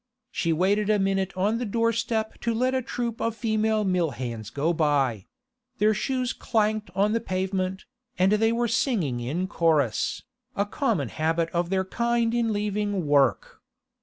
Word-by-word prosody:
She 170 - 0
waited 200 +5 +2
a 215 - +4
minute 195 -1 0
on 210 +5 +1
the - - -2
doorstep 230 0 -1
to 230 -1 0
let 255 +3 +1
a 260 - +1
troop 235 -2 -4
of 230 -1 -1
female 220 -1 +1
mill 180 -4 +1
hands 115 -4 -5
go 145 +7 0
by; 140 - +1 0.5
their 215 +1 +3
shoes 255 +2 -1
clanked 215 -2 0
on 200 +2 +2
the 230 - +1
pavement, 190 -1 -2 0.3
and 185 +2 +3
they 225 +2 +3
were 235 +1 +1
singing 200 - 0
in 155 +10 -2
chorus, 155 - +1 0.3
a 200 - +1
common 205 - -1
habit 165 +4 0
of 175 0 -1
their 190 0 0
kind 235 +3 0
in 235 -2 +1
leaving 205 -3 -1
work. 140 -5 +2
200 Hz, 165 wpm, -26 LUFS, 165-225 Hz, 0.5 s, a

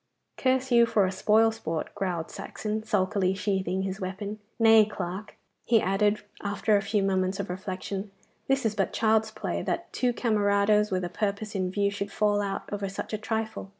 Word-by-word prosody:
'Curse 260 0 +1
you 235 -1 +6
for 205 -4 +3
a 185 - -1
spoil 220 +3 +4
sport!' 165 -8 -4
growled 175 -4 -3
Saxon, 215 0 -4
sulkily 190 -3 +1
sheathing 190 -2 -1
his 195 +1 -4
weapon. 200 +3 -4 0.2
'Nay, 225 -1 +7
Clarke,' 200 0 -6 0.3
he 230 -1 +4
added, 205 +2 +1 0.2
after 205 +1 +1
a 200 - +3
few 205 0 0
moments 190 0 0
of 195 -2 -3
reflection, 190 +2 -5 0.4
'this 270 -2 +1
is 220 - +2
but - - -1
child's 220 0 +2
play, 215 0 -3
that - - -3
two 250 -1 +1
camarados 210 -2 +2
with 185 -1 -1
a 175 - -2
purpose 205 +2 -2
in 185 -2 -1
view 200 +1 +1
should 200 0 -4
fall 205 -1 +2
out 195 -1 -3
over 200 -1 -2
such 195 - -6
a - - +1
trifle. 220 -2 -3
205 Hz, 185 wpm, -27 LUFS, 190-220 Hz, 0.4 s, Nay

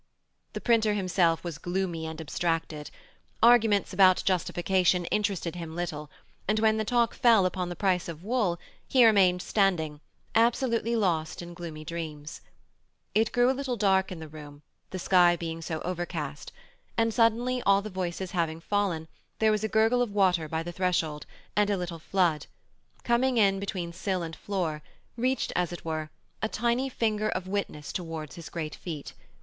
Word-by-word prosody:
The - - -5
printer 220 -3 +3
himself 180 -4 +1
was 170 -3 -5
gloomy 175 -2 -2
and 160 0 -7
abstracted; 160 -1 -2 0.5
arguments 225 -4 +5
about 185 -1 +5
Justification 180 -1 +1
interested 195 -5 -1
him 165 -2 -6
little, 155 -4 -4 0.4
and 215 +2 +2
when 220 0 +3
the 220 - 0
talk 235 +1 +2
fell 225 -6 +5
upon 180 -1 -1
the 175 - -5
price 185 -3 0
of 165 0 -8
wool, 210 -6 0 0.3
he 255 -3 +5
remained 185 -5 +4
standing, 160 -8 +1 0.3
absolutely 235 0 +2
lost 175 -6 0
in 175 0 -9
gloomy 165 -3 -8
dreams. 155 -2 -6 0.7
It 220 +1 +2
grew 245 +1 +4
a - - 0
little 265 -2 -2
dark 190 -3 +2
in 180 - -5
the 160 -1 -8
room, 150 -1 -11 0.3
the 185 - -5
sky 175 -1 +4
being 165 -1 -5
so 160 -1 -4
overcast, 170 -5 -4 0.5
and 225 -1 +2
suddenly, 240 +3 +2
all 200 -1 +3
the 215 - -6
voices 185 0 -3
having 165 -3 -1
fallen, 175 -4 -1 0.3
there 220 0 +3
was 215 0 0
a - - +1
gurgle 225 +3 +3
of 245 - +1
water 180 -6 +2
by 160 +1 -2
the 175 - -5
threshold, 170 -4 -1 0.3
and 210 0 +3
a 200 - +1
little 175 -2 -5
flood, 165 -3 +1 0.6
coming 245 +1 +2
in 195 -3 +4
between 185 -4 -4
sill 185 0 -2
and 165 -1 -6
floor, 175 -7 -3 0.3
reached 255 +3 0
as 180 -1 0
it 175 - -8
were, 155 -1 -3 0.3
a 220 - 0
tiny 240 +4 0
finger 215 -3 0
of 185 -2 -3
witness 190 -7 -3
towards 165 -4 -5
his 170 - -9
great 155 -3 -4
feet. 155 -5 -7
185 Hz, 170 wpm, -28 LUFS, 165-215 Hz, 0.7 s, arguments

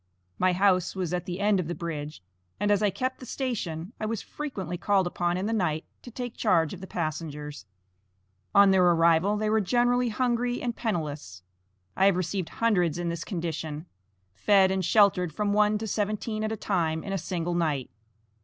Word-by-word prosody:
My 185 0 +3
house 185 -1 +2
was 180 -3 -2
at 180 +1 -2
the 180 0 -4
end 205 -1 +3
of 175 - -2
the 175 - -3
bridge, 150 - -6 0.4
and 205 +1 +1
as 205 0 +3
I 210 - +3
kept 255 +5 -3
the 255 - -9
station, 200 - -3
I 215 - -2
was 225 -1 -2
frequently 195 - -5
called 195 +1 +2
up 175 - -6 0.2
in 185 - -2
the 225 - -1
night 160 -7 0 0.2
to - - -10
take 245 0 -6
charge 170 -8 +2
of 185 - -9
the 190 - -8
passengers. 150 - -5 0.9
On 200 -1 +7
their 190 -1 +4
arrival 170 +3 +4
they 215 +1 -1
were 220 0 +3
generally 245 +4 +2
hungry 245 +1 0
and 240 -2 -3
penniless. 150 - -4 0.5
I 195 - +4
have 200 - +4
received 185 0 -2
hundreds 180 -8 +1
in 175 -1 -2
this 170 0 -3
condition; 160 -3 -4 0.5
fed 190 - +4
and 190 -1 0
sheltered 185 -3 +4
from 205 +5 -1
one 210 0 +3
to 220 - -5
seventeen 215 +1 -2
at 215 - -1
a 220 - -3
time 165 -6 -1
in 195 - -4
a - - 0
single 175 0 -3
night. 155 -6 -1
190 Hz, 190 wpm, -27 LUFS, 165-215 Hz, 0.9 s, On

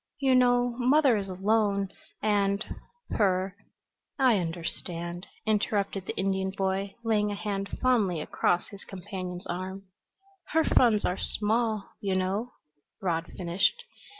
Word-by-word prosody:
"You 270 -2 +3
know 245 -1 +4
mother 265 0 +5
is 200 -2 -2
alone, 200 +1 +1 0.3
and 200 0 +2 0.5
her 190 -2 +1 0.3
" - - -60 0.3
"I 255 -7 +4
understand," 170 +1 -4 0.2
interrupted 205 -3 0
the - - -3
Indian 190 0 0
boy, 195 0 -2
laying 210 -2 +2
a - - -2
hand 200 -1 -3
fondly 215 -10 +2
across 175 +3 0
his 200 -2 -11
companion's 185 -2 -6
arm. 185 +2 -4 0.3
" 390 -1 -34
her 320 0 +4
funds 230 -8 +4
are 180 - 0
small, 220 0 0
you 195 -2 0
know," 195 +6 -1 0.5
Rod 170 -3 -1
finished. 185 - +1
200 Hz, 130 wpm, -28 LUFS, 185-225 Hz, 0.5 s, mother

